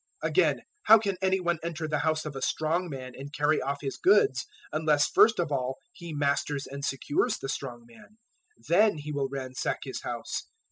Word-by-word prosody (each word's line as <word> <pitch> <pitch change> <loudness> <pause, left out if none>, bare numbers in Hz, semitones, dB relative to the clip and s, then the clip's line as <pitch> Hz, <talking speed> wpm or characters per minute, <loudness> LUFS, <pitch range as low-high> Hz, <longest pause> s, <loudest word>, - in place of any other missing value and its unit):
012:029 - - +1
Again, - - +3 0.2
how 220 - +9
can 200 -3 -1
any 190 0 +2
one 175 -2 0
enter 165 -1 -4
the 150 -1 0
house 155 0 0
of 150 -2 -5
a 135 - -5
strong 170 +3 0
man 130 -3 -7
and 140 +3 -9
carry 150 +1 +1
off 140 +1 -3
his 135 -2 -4
goods, 185 -11 +3 0.3
unless 155 -2 +3
first 220 0 +5
of 170 -4 -1
all 130 -1 -1 0.2
he 170 -1 -9
masters 145 -1 0
and 140 +1 -8
secures 140 +1 0
the - - -6
strong 125 -3 -5
man: 120 - -18 0.5
then 205 +2 +4
he 150 0 -6
will 140 -2 -1
ransack 130 -2 -3
his - - -5
house. - - -4
150 Hz, 195 wpm, -28 LUFS, 135-170 Hz, 0.5 s, how